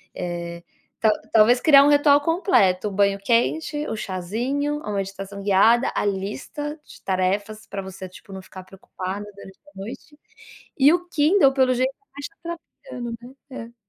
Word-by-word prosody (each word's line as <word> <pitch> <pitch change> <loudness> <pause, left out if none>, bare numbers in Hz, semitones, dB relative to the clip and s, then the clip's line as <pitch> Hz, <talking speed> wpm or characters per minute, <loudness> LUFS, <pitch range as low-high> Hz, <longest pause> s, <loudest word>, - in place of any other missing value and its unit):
Eh, 170 -1 -5 0.4
tal 220 -1 +4 0.2
talvez 230 +3 +5
criar 280 -3 +7
um 290 - +4
ritual 290 0 +5
completo. 290 - +2
O - - -4
banho 200 0 +2
quente, 295 +8 0
o - - -3
chazinho, 230 +10 -2
ou 295 - -7
a 210 - -4
meditação 195 0 -5
guiada, 210 +5 +4
a - - 0
lista 215 - -4
de - - -15
tarefas 200 +3 -1
pra 195 - -5
você, 190 0 -8
tipo, 190 +2 -15
não 190 - -7
ficar 185 0 -11
preocupada 190 +1 -7
durante 195 -1 -13
a - - -23
noite. 235 +10 -9 0.6
E 280 +2 +6
o 355 0 -1
Kindle 300 -2 +4
pelo 260 -1 +3
jeito, 255 +2 0 0.2
tá 280 - -11
te 285 - -6 0.5
atrapalhando, 240 - -6
né. 250 +3 -13 0.2
É. 230 -4 -11
220 Hz, 170 wpm, -23 LUFS, 195-280 Hz, 0.6 s, criar